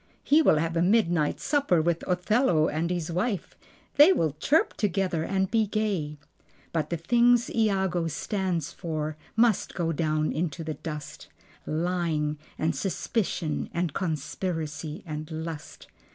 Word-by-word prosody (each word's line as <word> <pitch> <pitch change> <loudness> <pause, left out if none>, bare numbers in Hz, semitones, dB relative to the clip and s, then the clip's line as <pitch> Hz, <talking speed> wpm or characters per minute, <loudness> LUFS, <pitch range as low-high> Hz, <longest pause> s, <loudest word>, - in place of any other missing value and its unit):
He 300 +3 +5
will 305 - +5
have 165 +2 -1
a 165 - +2
midnight 175 -5 +2
supper 280 - +2
with 170 +1 0
Othello 180 - +2
and 160 +3 -1
his 175 -2 -2
wife. 185 +3 -2 0.4
They 295 +6 +9
will 160 - +1
chirp 310 - +2
together 190 -4 0
and 190 +2 0
be 220 -2 +2
gay. 195 -9 -1 0.6
But 160 -2 -1
the 170 - -1
things 240 +7 +3
Iago 190 -6 +1
stands 180 -1 -2
for 155 -3 -4 0.2
must 225 -2 +2
go 165 -2 0
down 155 -1 0
into 165 0 -2
the 155 0 -3
dust: 150 -1 -7 0.4
Lying 155 -2 -1 0.2
and 160 +1 0
suspicion 185 -5 -2
and 170 -3 -1
conspiracy 160 -2 -3
and 155 -1 -5
lust. 160 -1 -7
170 Hz, 135 wpm, -27 LUFS, 155-195 Hz, 0.6 s, They